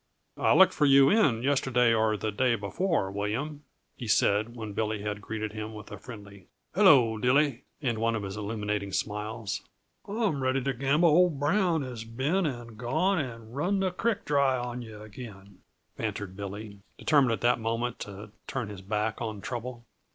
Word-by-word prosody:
"I - - +4
looked - - +7
for 150 - +3
you 135 0 +7
in 140 - +3
yesterday 130 -4 +3
or 110 -1 +2
the 110 +2 -2
day 120 +3 +2
before, 110 - -1
William," 120 +10 -3 0.3
he 120 - -7
said, 105 +2 +2
when 110 -3 -6
Billy 105 0 -2
had 105 0 -3
greeted 110 0 -4
him 110 0 -6
with 105 -1 -10
a - - -7
friendly, 100 -5 -11 0.3
"Hello, 135 - +5
Dilly!" 135 +1 +2 0.2
and 120 -4 0
one 115 0 +1
of 110 - -3
his 95 0 -5
illuminating 105 -2 -3
smiles. 105 0 -3 0.5
"I'm 205 - -1
ready 130 0 +1
to 135 +1 0
gamble 140 +7 +3
old 165 -2 +4
Brown 165 +1 +2
has 125 -4 -6
been 140 +11 0
and 120 -5 -7
gone 160 +10 +1
and 115 -4 -6
run 185 +8 +1
the 190 -1 +1
creek 225 +4 -1
dry 140 -3 +2
on 125 0 -4
yuh 110 -2 -10
again," 100 -3 -11 0.4
bantered 95 -2 -4
Billy, 100 +1 -7 0.2
determined 140 -6 +3
at - - -3
that 120 +1 +3
moment 115 +2 -2
to 100 +1 -8 0.2
turn 130 -7 -3
his 100 -2 -8
back 105 +2 -2
on 110 -3 -4
trouble. 120 +2 -6
115 Hz, 175 wpm, -28 LUFS, 105-140 Hz, 0.5 s, looked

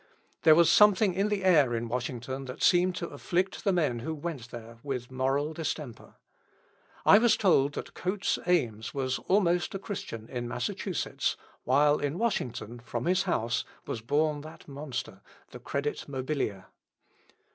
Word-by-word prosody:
There 155 - +7
was 170 0 +5
something 210 -2 +5
in 200 +3 +1
the 205 -2 -1
air 150 -10 +4
in 115 0 -2
Washington 125 +2 -4
that 130 +3 -6
seemed 180 0 +4
to 170 -2 -4
afflict 185 +2 -2
the 200 - +3
men 155 -10 +1
who 160 +7 -4
went 145 -6 -6
there 115 -1 -10
with 130 -2 -4
moral 135 +4 0
distemper. 150 -6 -5 0.9
I 205 - +8
was 235 0 +4
told 145 -8 +3
that - - -6
Coates 190 +2 -1
Ames 120 -12 0
was 130 -1 -1
almost 180 -3 +2
a - - 0
Christian 180 - -6
in 120 -1 -4
Massachusetts, 120 0 -2 0.3
while 145 +3 +4
in 145 +3 -2
Washington, 120 - -2
from 120 - -5
his 185 +2 +3
house, 115 -6 0 0.2
was 115 - -4
born 145 +4 +1
that 155 +2 -12
monster 140 -2 -6 0.3
The - - -9
Credit 145 +1 -3
Mobilier. 130 -8 -3
145 Hz, 155 wpm, -29 LUFS, 125-175 Hz, 0.9 s, I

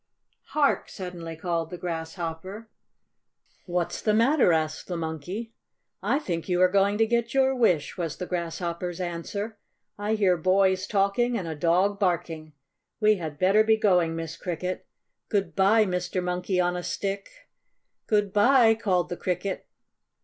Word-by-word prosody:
"Hark!" 290 -2 +2
suddenly 175 -4 -7
called 165 -1 -2
the 180 - -7
Grasshopper. 170 +5 -5 1.0
"What's 175 -1 -2
the 215 -1 +2
matter?" 240 - +4
asked 155 -1 -1
the 175 - -3
Monkey. 170 +8 -5 0.5
"I 275 - +1
think 175 - -4
you 180 -1 +1
are 185 0 +5
going 200 +1 +3
to 225 - +4
get 235 +2 -1
your 265 0 +4
wish," 180 - +1
was 165 -3 -3
the 180 - -4
Grasshopper's 175 0 -3
answer. 200 +5 -4 0.4
"I 210 +2 0
hear 190 -4 +3
boys 190 +2 +2
talking 210 +4 +1
and 185 -5 -4
a 160 - -3
dog 180 +6 +1
barking. 165 -5 -1 0.5
We 215 -1 +4
had 160 -4 -6
better 195 +5 +4
be 220 0 +3
going, 180 -6 +2
Miss 165 -1 -5
Cricket. 180 +1 -4 0.4
Good 200 -3 -1
bye, 210 +3 +4
Mr. 180 0 -2
Monkey 180 +1 -1
on 180 0 +1
a 180 - -3
Stick!" 195 +2 -3 0.8
"Good 205 -2 +1
bye," 230 +2 +6
called 185 -5 0
the 175 - -4
Cricket. 185 +1 -3
185 Hz, 150 wpm, -26 LUFS, 170-210 Hz, 1.0 s, bye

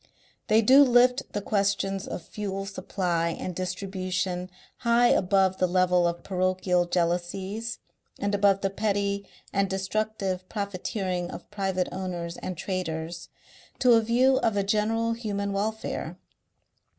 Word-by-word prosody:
They 220 0 +4
do 265 +6 +8
lift 250 0 +4
the 205 - -2
questions 195 -1 0
of 170 - -5
fuel 195 +1 -4
supply 185 -3 -1
and 185 - -4
distribution 185 0 -3 0.3
high 235 0 +4
above 190 0 +3
the 185 - +2
level 180 -1 +3
of 170 0 -3
parochial 185 -1 +1
jealousies 185 +6 -2 0.4
and 205 0 -1
above 200 -1 +3
the 195 - 0
petty 200 -1 -1 0.3
and 195 0 +1
destructive 190 -1 -2
profiteering 190 -3 -3
of 170 - -9
private 190 -3 -1
owners 175 -3 -4
and 185 -2 -5
traders, 170 -2 -4 0.5
to 250 -2 +5
a 225 - +6
view 250 +4 +3
of 225 -5 +1
a 200 - +2
general 225 +3 +1
human 200 -3 -3
welfare. 200 -4 -3
195 Hz, 130 wpm, -27 LUFS, 185-210 Hz, 0.5 s, do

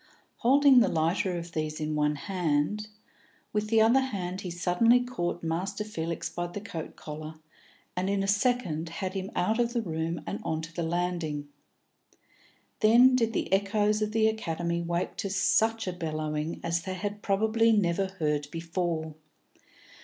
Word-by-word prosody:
Holding 270 +1 +6
the 235 - +4
lighter 170 +3 0
of 170 0 -6
these 155 -1 -3
in 155 0 -2
one 150 0 +1
hand, 180 +4 -1 0.7
with 210 0 0
the 220 0 +4
other 235 +4 +5
hand 190 -8 -3
he 185 - -5
suddenly 180 +8 +3
caught 175 -9 -3
Master 185 +6 -2
Felix 170 -6 -4
by 175 0 -4
the 175 +4 -6
coat 170 -6 -7
collar, 155 +1 -8 0.6
and 185 +2 -1
in 200 -1 +1
a - - -1
second 200 -6 +1
had 185 +3 -4
him 195 0 -4
out 220 +6 +1
of 235 0 +1
the 235 - +1
room 165 -2 -2
and - - -4
on 160 0 -2
to 165 +1 -8
the 170 - -3
landing. 165 -3 -2 1.3
Then 240 +4 +6
did 230 -3 +2
the - - -1
echoes 210 +2 +2
of 215 0 0
the 220 0 +3
Academy 170 -5 -1
wake 170 +1 -2
to 200 - -2
such 220 +3 +2
a 185 - -1
bellowing 155 -2 -3
as 170 0 0
they 185 +2 -4
had 205 +2 -4
probably 220 +3 +2
never 195 -2 +2
heard 150 -6 -1
before. 165 -1 -3
180 Hz, 165 wpm, -28 LUFS, 165-215 Hz, 1.3 s, Holding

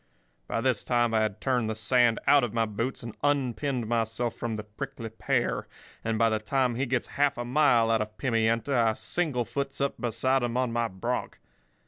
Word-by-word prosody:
By 115 - -1
this 125 -3 +1
time 120 -2 +1
I 110 - +4
had 110 -1 -1
turned 125 -3 0
the 110 - -2
sand 115 +1 +3
out 145 -1 +6
of 120 -2 -2
my 115 -1 +2
boots 115 +5 -3
and 115 -2 -7
unpinned 135 -2 0
myself 115 +1 -1
from 115 -1 -4
the 105 - -5
prickly 110 +2 -7
pear; 110 - -1 0.4
and 115 -1 -1
by 115 0 +4
the 110 - +1
time 125 +3 +1
he 130 +4 -1
gets 125 -1 0 0.2
half 145 -3 +3
a 120 - -3
mile 120 -4 +4
out 110 -1 +2
of 105 0 -5
Pimienta, 115 +3 +1
I 115 -2 +3
singlefoots 140 -1 -2
up 140 0 -1
beside 130 +3 +1
him 120 0 -1
on 125 -2 0
my 120 0 +1
bronc. 115 +6 -3
120 Hz, 195 wpm, -28 LUFS, 110-130 Hz, 0.4 s, out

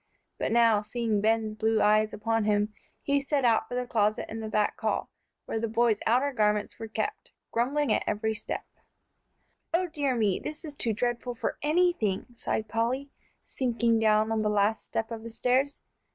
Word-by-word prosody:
But - - -1
now, 230 -2 +4
seeing 220 -1 -1
Ben's 220 0 +1
blue 220 +1 +1
eyes 215 +1 +4
upon 225 +1 0
him, 210 0 +1 0.3
he 280 0 +2
set 275 -1 0
out 230 -2 +3
for 245 - -5
the 250 0 -1
closet 215 -3 +1
in 225 - -4
the 220 -1 -5
back 210 -1 0
hall - - -1 0.3
where 225 - -2
the 230 - -1
boys' 225 -1 +2
outer 260 +5 +2
garments 210 -2 0
were 225 - -5
kept, 420 - -3 0.2
grumbling 260 +1 +1
at - - +1
every 220 +1 0
step. 215 - -5 1.1
"O 365 +2 +2
dear 290 -6 -1
me! 210 -5 +1
This 305 +2 -6
is 300 - -6
too 235 -5 0
dreadful 240 +2 -2
for - - -3
anything," 300 - +1
sighed 220 -1 -2
Polly, 240 +6 -1 0.3
sinking 235 -3 +1
down 215 0 +3
on 220 -1 +1
the 210 - +1
last 210 +1 +1
step 225 +1 -3
of 225 -1 -5
the 230 - -7
stairs. 255 +5 0
225 Hz, 180 wpm, -28 LUFS, 215-250 Hz, 1.1 s, now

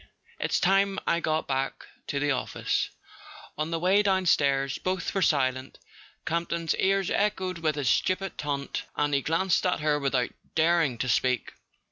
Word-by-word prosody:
It's - - 0
time 195 +1 +3
I 170 - +2
got 155 -1 -1
back 135 0 -2 0.2
to 140 - -1
the 145 +1 +1
office." 125 -2 -1 0.7
On 155 +1 -2
the 165 - -1
way 185 +5 +3
downstairs 145 -9 +2
both 185 -1 -2
were 195 - 0
silent. 130 -5 +1 0.5
Camp 170 +1 -1
ton's 165 -1 -1
ears 195 -1 +2
echoed 190 -4 0
with 155 -2 0
his 145 -3 -2
stupid 185 +7 +1
taunt, 140 -1 -3
and 145 0 0
he 140 - +2
glanced 165 +4 +1
at 180 -4 0
her 150 -1 +1
without 135 -3 0 0.2
daring 160 -5 +2
to 130 - -2
speak. 125 -1 +1
160 Hz, 160 wpm, -27 LUFS, 140-185 Hz, 0.7 s, time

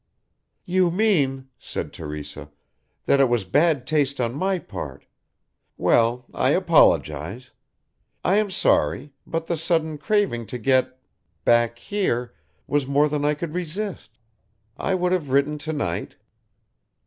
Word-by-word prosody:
"You 185 -1 +2
mean," 150 -10 +1
said - - -6
Teresa, 75 0 -7 0.6
"that 140 - +3
it 135 -2 +4
was 120 -5 0
bad 145 - +2
taste 140 -2 0
on 120 -1 0
my 190 +6 0
part - - -8 0.7
well, 120 +2 +2
I - - +1
apologise. 85 - +2 0.7
I 195 - +3
am 215 -1 +1
sorry, 150 -5 +1
but 165 0 -2
the 170 - -1
sudden 160 -1 -1
craving 150 - 0
to 125 - -5
get 130 +2 +1 0.5
back 120 0 +3
here 125 - -2 0.3
was 145 -2 0
more 145 +2 +3
than 145 0 -2
I 150 +1 +2
could 155 +1 -5
resist. 180 +3 -5 0.6
I 190 - -1
would 180 -1 0
have 175 -7 0
written 140 +3 +1
to 160 +2 -4
night." 90 - -3
145 Hz, 135 wpm, -23 LUFS, 120-170 Hz, 0.7 s, it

